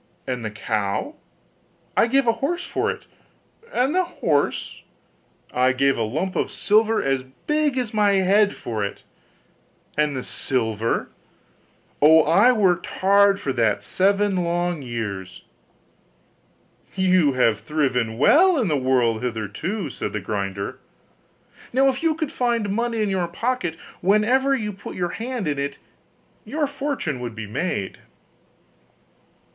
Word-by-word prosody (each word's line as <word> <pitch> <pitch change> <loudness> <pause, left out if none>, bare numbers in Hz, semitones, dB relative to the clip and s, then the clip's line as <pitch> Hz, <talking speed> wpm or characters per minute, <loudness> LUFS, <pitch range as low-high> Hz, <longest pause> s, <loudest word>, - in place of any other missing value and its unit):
'And 125 -2 -3
the 110 - -2
cow?' 105 -1 -2 0.8
'I - - +4
gave 270 +2 +2
a 230 - +5
horse 345 +6 -1
for - - -1
it.' - - -5 0.7
'And 260 +4 +1
the 370 +1 +3
horse?' 165 - -1 0.7
'I 130 +1 +3
gave 135 +1 +2
a - - -3
lump 155 - -2
of - - 0
silver 220 +1 +2
as 135 -1 0 0.2
big 300 -3 +1
as 245 -4 -2
my 205 -2 +3
head 200 +2 +3
for 110 -3 -4
it.' 100 - -5 0.9
'And 150 -2 +1
the 130 - -4
silver?' 115 -3 -1 0.9
'Oh! 160 +2 +7
I 200 +10 +5
worked 190 -7 +2
hard 200 +1 +3
for 140 -9 -2
that 105 -4 +1
seven 195 - +1
long 175 -1 -1
years.' 105 -7 -5 1.5
'You 185 -6 +3
have 115 -5 +2
thriven 130 -7 -1
well 340 - +5
in 220 -8 +1
the 150 - +2
world 125 -4 +1
hitherto,' 125 - -3
said - - -5
the 105 - -1
grinder, 100 -1 -4 0.9
'now 270 +2 +4
if 265 0 -2
you 325 -1 +2
could 315 -3 -3
find 235 -5 0
money 230 +1 0
in 210 - 0
your 185 -3 0
pocket 200 -1 -2 0.2
whenever 240 +8 +3
you 210 -4 -3
put 195 - -9
your 175 -1 -1
hand 230 -1 -4
in 145 -2 -1
it, 140 0 -3 0.7
your 300 0 -1
fortune 275 - -3
would 120 -2 -6
be 110 -1 -5
made. 105 - -3
175 Hz, 140 wpm, -23 LUFS, -, 1.5 s, Oh